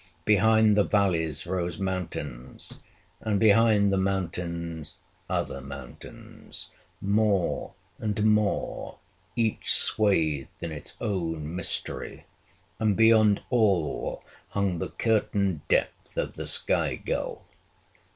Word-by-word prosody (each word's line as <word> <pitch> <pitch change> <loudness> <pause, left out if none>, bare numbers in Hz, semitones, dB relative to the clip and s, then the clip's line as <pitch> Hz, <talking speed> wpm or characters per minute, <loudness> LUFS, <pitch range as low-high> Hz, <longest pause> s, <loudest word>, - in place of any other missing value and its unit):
Behind 110 +1 +4
the 105 - +4
valleys 90 -8 +1
rose 90 -1 -2
mountains; 90 -10 -5 0.4
and 105 -3 -1
behind 105 -1 +4
the 95 - +2
mountains, 85 -4 -3 0.3
other 70 - -2
mountains, 70 -2 -9 0.3
more 100 -2 0 0.2
and 105 -1 -1
more, 105 -1 0 0.4
each 115 -2 +1
swathed 80 -10 +3
in 85 - -3
its 75 -2 -4
own 80 -5 -3
mystery; 90 - -2 0.5
and 105 -3 +1
beyond 110 -2 +5
all 100 -10 +1 0.3
hung 100 -4 -1
the - - -3
curtain 100 -6 0
depth - - -1
of - - -1
the - - -5
sky - - +1
gulf. - - -4
100 Hz, 100 wpm, -27 LUFS, 85-105 Hz, 0.5 s, beyond